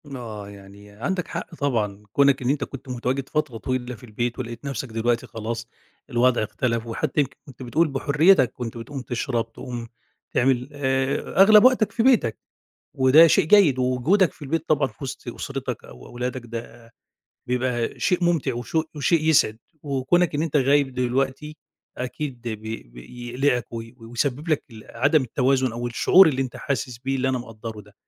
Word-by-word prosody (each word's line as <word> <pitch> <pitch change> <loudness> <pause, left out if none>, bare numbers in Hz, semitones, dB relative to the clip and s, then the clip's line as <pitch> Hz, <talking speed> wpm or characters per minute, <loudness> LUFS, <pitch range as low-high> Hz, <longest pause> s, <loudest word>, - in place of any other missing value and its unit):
آه، 105 -4 -7
يعني 100 +1 -14
عندك 150 - -3
حق - - -6
طبعًا 105 -9 -1
كونك 140 -1 +4
إن 125 - -1
أنت 140 -1 +1
كنت 135 -1 -9
متواجد 125 +2 -2
فترة 150 -7 -1
طويلة 125 +2 -3
في 110 - -18
البيت، 120 +2 -3
ولقيت 120 +2 -6
نفسك 135 -2 -4
دلوقتي 115 +1 -1
خلاص 115 +1 -5 0.4
الوضع 120 -2 +3
اختلف، 115 +1 -2
وحتى 125 +5 -2
يمكن 135 -1 -4
كنت 130 -1 -11
بتقول 155 +7 +2
بحريتك 145 - +3
كنت 120 -2 -6
بتقوم 130 +4 -6
تشرب، 120 -2 -3
تقوم 120 -3 -7 0.4
تعمل، 125 +1 +1
آآ، 135 +4 0
أغلب 210 +2 +8
وقتك 255 -4 +4
في 230 0 0
بيتك، 230 - +3 0.6
وده 135 +5 +7
شيء - - +4
جيد 160 -6 +5
ووجودك 130 +10 +2
في - - -18
البيت 155 +3 -2
طبعًا 145 -3 +2
في 110 - -21
وسط 130 -1 -7
أسرتك، 130 0 -5
أو 60 - -13
أولادك 125 +1 -4
ده 115 +1 -8 0.6
بيبقى 125 -1 -1
شيء 180 -1 +1
ممتع 155 -7 +1
وشو 140 +7 -1
وشيء 155 +2 +2
يسعد، 140 -8 +3 0.2
وكونك 145 +4 +1
إن 145 - 0
أنت 160 -2 0
غايب 140 0 +3
دلوقتي، 135 +4 -1 0.4
أكيد 125 0 -5
بي 110 0 -5
بي 65 - -11
يقلقك 125 -3 0
و 115 -1 -4
ويسبب 125 +6 -3
لك 155 - +1
ال 110 -1 -12
عدم 145 +5 +2
التوازن 130 0 +1
أو 120 +1 -4
الشعور 160 +9 +6
اللي 135 -2 0
أنت 130 -2 -6
حاسس 130 -4 -3
بيه، 135 +2 -2
اللي 130 0 0
أنا 130 -1 0
مقدره 115 -2 -8
ده. 105 0 -18
130 Hz, 170 wpm, -24 LUFS, 115-145 Hz, 0.6 s, أغلب